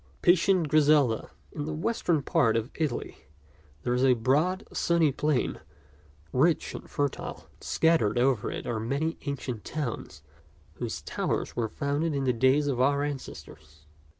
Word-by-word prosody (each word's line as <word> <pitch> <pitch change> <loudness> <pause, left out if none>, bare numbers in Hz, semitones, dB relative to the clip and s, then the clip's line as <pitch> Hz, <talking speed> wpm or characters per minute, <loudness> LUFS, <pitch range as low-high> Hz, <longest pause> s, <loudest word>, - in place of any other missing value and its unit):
PATIENT 175 -1 +4
GRISELDA 145 -6 +3 0.2
IN 145 - -4
the 155 0 -3
western 170 -4 0
part 115 -3 +2
of 115 +3 -3
Italy 155 -3 -3 0.7
there 120 - 0
is 125 +1 +1
a 130 -2 +5
broad, 150 - +1
sunny 170 -3 +2
plain, 145 -1 0 0.7
rich 155 +6 +2
and - - -9
fertile, 145 -2 -3
and - - -21
scattered 160 -10 +2
over 125 -3 +2
it - - -5
are 115 -2 -2
many 140 +8 -2
ancient 125 -5 -4
towns 120 - -5 0.5
whose - - -4
towers - - -2
were 115 -2 -1
founded 145 +5 -1
in 140 - -1
the 130 -1 +2
days 130 +5 +3
of 130 -3 0
our 140 +2 +3
ancestors. 80 - -8
140 Hz, 150 wpm, -28 LUFS, 120-155 Hz, 0.7 s, a